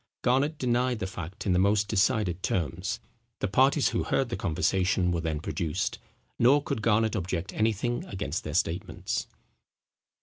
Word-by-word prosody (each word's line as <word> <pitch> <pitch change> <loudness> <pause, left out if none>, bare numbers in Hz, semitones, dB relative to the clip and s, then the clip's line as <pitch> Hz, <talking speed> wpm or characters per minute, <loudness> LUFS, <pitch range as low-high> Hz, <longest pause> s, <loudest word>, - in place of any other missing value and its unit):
Garnet 135 +5 +2
denied 125 -1 +1
the 110 - -3
fact 90 -1 -7
in 95 - +2
the 90 - +3
most 100 +2 +3
decided 100 -3 +1
terms. 90 - -1 0.4
The - - -1
parties 135 +7 +3
who - - -1
heard 135 -3 0
the 115 - -2
conversation 90 +2 +1
were 85 -1 -1
then 80 -2 -2
produced: 85 +3 -2 0.4
nor 140 +5 +5
could 110 - -2
Garnet 110 0 +2
object 90 -1 -3
anything 115 +2 0
against 95 -4 -4
their 75 0 -5
statements. 85 0 -1
100 Hz, 155 wpm, -28 LUFS, 90-120 Hz, 0.4 s, nor